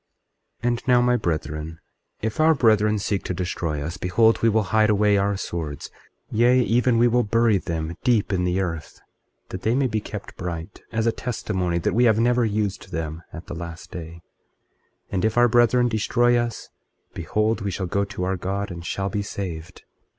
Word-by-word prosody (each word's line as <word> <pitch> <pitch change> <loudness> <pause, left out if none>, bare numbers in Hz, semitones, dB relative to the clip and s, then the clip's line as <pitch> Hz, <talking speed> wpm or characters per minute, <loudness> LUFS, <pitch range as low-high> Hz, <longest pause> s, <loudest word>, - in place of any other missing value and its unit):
24:16 - - +1
And 120 +2 -3
now, 125 -1 +5
my 125 0 +3
brethren, 80 - -3 0.4
if 110 +4 -2
our 160 +1 +5
brethren 110 -4 +3
seek 100 -1 -2
to 90 - -2
destroy 85 -4 -3
us, 85 +5 -5
behold, 110 +6 +3
we 115 - +4
will 110 0 +2
hide 110 -1 +4
away 105 0 +3
our 100 0 +1
swords, 80 -7 -5 0.4
yea, 120 +3 +4
even 120 0 +2
we 120 +1 +5
will 120 +1 +3
bury 115 -1 +2
them 85 -3 -4
deep 115 -6 +2
in 90 -1 +1
the 90 +1 0
earth, 85 -5 -5 0.5
that 95 - -6
they 110 +4 +1
may 135 0 +2
be 110 -3 0
kept 105 -1 -8
bright, 85 0 -6
as 110 0 0
a 115 - +3
testimony 95 -8 -2
that 85 - 0
we 120 +2 +4
have 110 -2 +4
never 120 +1 +3
used 105 -3 -2
them, 80 0 -4
at 85 +1 -9
the - - -7
last 85 0 -8
day; 85 -1 -8 0.9
and 95 -1 -1
if 110 +1 +1
our 120 0 +6
brethren 120 +1 +4
destroy 120 +2 +2
us, 120 -1 -2 0.4
behold, 110 +1 -1
we 100 - -2
shall 95 0 -3
go 100 +3 0
to 100 -2 -5
our 95 +1 -1
God 100 +2 -3
and 85 -1 -7
shall 95 +3 -2
be 105 - -1
saved. 90 -4 -6
100 Hz, 195 wpm, -23 LUFS, 90-115 Hz, 0.9 s, our